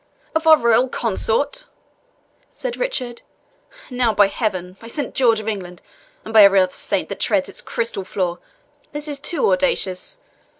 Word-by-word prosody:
"Of 320 0 0
our 315 -1 +9
royal 235 +1 +3
consort!" 250 - -1 0.9
said - - -5
Richard. 255 - -3 0.7
"Now 245 -3 +1
by 205 -1 +5
Heaven, 185 -5 -3
by 230 - -11
Saint 280 +2 -4
George 230 -4 +3
of 215 - -8
England, 180 -5 -4 0.5
and 225 - -7
every 200 -2 +8
other 185 -1 +1
saint - - -2
that - - -6
treads - - +1
its - - -5
crystal 230 -4 -3
floor, 180 -2 -2 0.5
this 295 +1 -4
is 290 -2 -4
too 295 +1 0
audacious! 275 - 0
230 Hz, 155 wpm, -20 LUFS, 195-285 Hz, 0.9 s, our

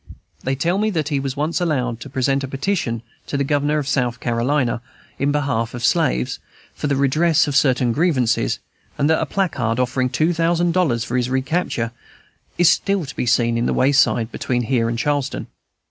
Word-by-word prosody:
They 135 +1 0
tell 170 +7 0
me 215 +1 +1
that 155 -7 -1
he 145 -3 0
was 135 0 -4
once 155 +5 -1
allowed 125 -9 -1
to 140 - -9
present 135 +1 0
a - - -3
petition 135 - -2 0.2
to 140 - -2
the 140 - +1
Governor 145 +2 +1
of 145 -3 -2
South 125 -4 0
Carolina 120 0 0 0.4
in 140 +1 +1
behalf 130 -6 -1
of 120 0 -2
slaves, 60 +1 +1 0.3
for - - -3
the 140 - +1
redress 155 +4 +3
of 145 - -2
certain 125 -3 +3
grievances; 140 -5 +1 0.4
and 145 - +2
that 160 - +2
a 160 - -1
placard, 130 - -1
offering 125 0 0
two 155 +7 +1
thousand 170 +1 +1
dollars 155 -11 +1
for 125 0 -2
his 125 0 0
recapture, 130 -3 -1 0.7
is 175 - +5
still 190 +1 +2
to 135 - -9
be 125 - -2
seen 120 0 +3
by 115 - 0
the 120 - 0
wayside 130 -4 +3
between 120 -1 -1
here 115 -1 +1
and 115 - -2
Charleston. 145 +1 -1
135 Hz, 190 wpm, -20 LUFS, 120-155 Hz, 0.7 s, is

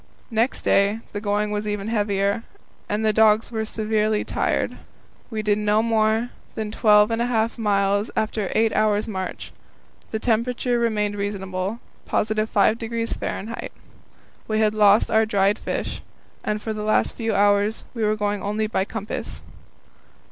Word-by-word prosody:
Next 230 +3 0
day 200 +3 +2
the 205 - -4
going 210 0 0
was 210 0 -2
even 205 0 -3
heavier, 205 -1 0 0.5
and 210 +1 0
the 215 - +3
dogs 220 +1 +4
were 220 -1 -1
severely 215 -1 0
tried. - - 0 0.6
W 225 - -6
e - - +1
did 210 0 +2
no 210 +1 +2
more 225 +1 +1 0.2
than 215 -2 -3
twelve 210 -1 +5
and 225 +1 0
a 240 - +1
half 230 -1 0
miles 200 0 +1
after 215 -2 -1
eight 220 0 +3
hours' 210 -1 +2
march. 190 -4 -5 0.6
The 220 - -2
temperature 240 +2 0
remained 210 -3 0
reasonable, 195 0 -3 0.3
+5° 220 +1 0
F. - - -6 0.8
We 215 - 0
had 215 -1 +3
lost 210 0 +4
our 220 0 +4
dried 200 -1 +2
fish, - - -4 0.4
and 210 0 -1
for 220 +1 -4
the 215 - -5
last 215 0 +1
few 225 -2 -2
hours 205 +2 +2
were 215 -3 +1
going 205 -1 -1
only 210 +2 -1
by 215 -3 0
compass. 215 -1 -6
215 Hz, 150 wpm, -23 LUFS, 205-220 Hz, 0.8 s, twelve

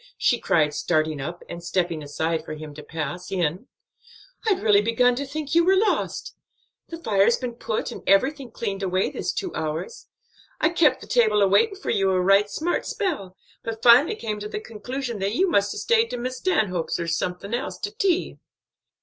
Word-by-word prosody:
she 240 - +2
cried, 150 -7 +2
starting 155 -1 0
up, 175 +5 -6
and 170 0 -8
stepping 175 -2 -1
aside 160 +2 -2
for 155 - -6
him 155 -1 -9
to 150 - -9
pass 160 +3 -5
in. 180 - -1 0.8
"I'd 395 -3 +2
really 210 -2 +5
begun 230 +3 +3
to 280 +1 -3
think 295 +1 -5
you 340 +1 +5
was 380 +2 +4
lost. 425 +2 0 0.6
The 330 - -6
fire's 220 -6 +3
been 250 -2 -4
put 225 -2 -3
and - - -8
everything 265 +7 +2
cleaned 200 -3 -4
away 185 0 0
this - - -2
two 370 -3 -4
hours. 160 - -4 0.5
I 315 - +3
kep' 335 -3 +3
the - - -9
table 215 -4 +3
a - - +5
waitin' 395 - +3
for 395 - -4
you 195 -1 +2
a 185 -1 +2
right 195 +3 +4
smart 335 +10 -2
spell, 235 - -3 0.2
but 225 -1 -6
finally 250 - +7
come 215 - -4
to 210 +1 -6
the 210 - -4
conclusion 235 +2 -5
that 200 +3 -1
you 380 +7 +3
must 200 - +2
'a' - - -6
stayed 460 -1 +2
to 245 - -4
Miss 255 +1 -4
Stanhope's 185 - 0
or 170 - -2
someone 180 +5 -3
else, 260 +4 -3
to 410 +1 -5
tea." 390 -6 0
210 Hz, 195 wpm, -24 LUFS, 180-280 Hz, 0.8 s, finally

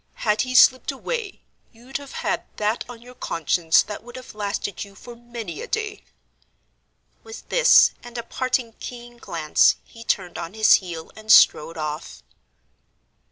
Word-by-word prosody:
Had 210 0 +2
he 255 0 -3
slipped 255 +1 +6
away, 420 - -5 0.3
you'd 245 +3 -7
have 280 -1 -12
had - - -1
that 215 +2 -1
on 235 -1 -11
your 250 +1 -13
conscience 165 - +1
that 210 0 -8
would 245 +1 -12
have 255 -1 -10
lasted 205 -1 -4
you 200 -1 -14
for 240 +4 -12
many 235 -8 -8
a - - -7
day." 430 -1 -3 1.2
With 445 +1 -11
this, - - +6
and 240 0 -10
a 235 - -4
parting 250 -1 -2
keen 240 -1 -9
glance, 165 -8 +2
he 230 - -14
turned 185 -5 -2
on 170 +4 -7
his 220 0 +5
heel 170 -3 -8
and 220 0 -2
strode 165 -3 +6
off. 150 - -6
230 Hz, 160 wpm, -23 LUFS, 190-255 Hz, 1.2 s, slipped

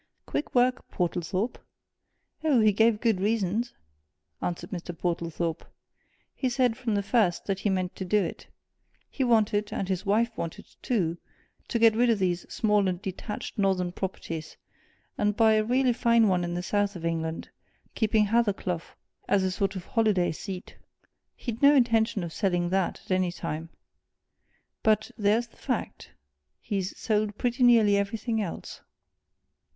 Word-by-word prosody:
"Quick 295 - -4
work, 250 0 +2
Portlethorpe." 180 +5 -2 0.8
"Oh, 295 -6 +4
he 215 -1 +5
gave 220 +1 +3
good 225 -6 +2
reasons!" 215 +2 0 0.7
answered 175 - -4
Mr. 175 -1 -6
Portlethorpe. 170 -1 -2 0.7
"He 260 - -1
said, 245 -2 +2
from 235 -4 -2
the 200 - 0
first, 200 -5 +1
that 195 -1 -1
he 205 - 0
meant 185 -2 -1
to - - -3
do 190 +3 +2
it 165 - -6 0.6
he 270 - -1
wanted, 210 -3 +2
and 195 - -2
his 185 -2 -1
wife 220 +3 +1
wanted 165 -5 -5 0.2
too, 175 -8 0 0.5
to 235 - -1
get 225 -1 +5
rid 240 +2 +3
of 230 - +3
these 180 -2 -1
small 210 -3 +2
and 180 -1 -1
detached 205 +2 -6
Northern 190 -3 +1
properties, 165 -4 -5 0.6
and 210 0 +1
buy 220 -1 +5
a 215 0 +3
really 250 +2 +2
fine 235 -2 +4
one 180 -2 +2
in 175 0 -3
the 175 - -3
South 205 +1 0
of 165 -2 -6
England, 160 -1 -2 0.4
keeping 220 -1 +2
Hathercleugh 205 -6 0 0.5
as 195 -1 +3
a 190 - 0
sort 195 +1 -1
of 185 - -6
holiday 215 -6 +2
seat. 185 +3 -7 0.6
He'd 235 -1 -5
no 285 +1 +7
intention 225 -6 +2
of 165 -1 -6
selling 175 -4 0
that, 190 -1 0
at - - -9
any 185 -1 +2
time. 165 -2 -5 1.1
But 215 0 +2
there's 215 +3 +2
the 230 - -25
fact! - - -4 0.5
he's 195 -2 -3
sold 210 -2 0
pretty 245 +1 -1
nearly 225 -5 +6
everything 220 +3 -1
else." 185 -5 -6
205 Hz, 155 wpm, -27 LUFS, 180-225 Hz, 1.1 s, no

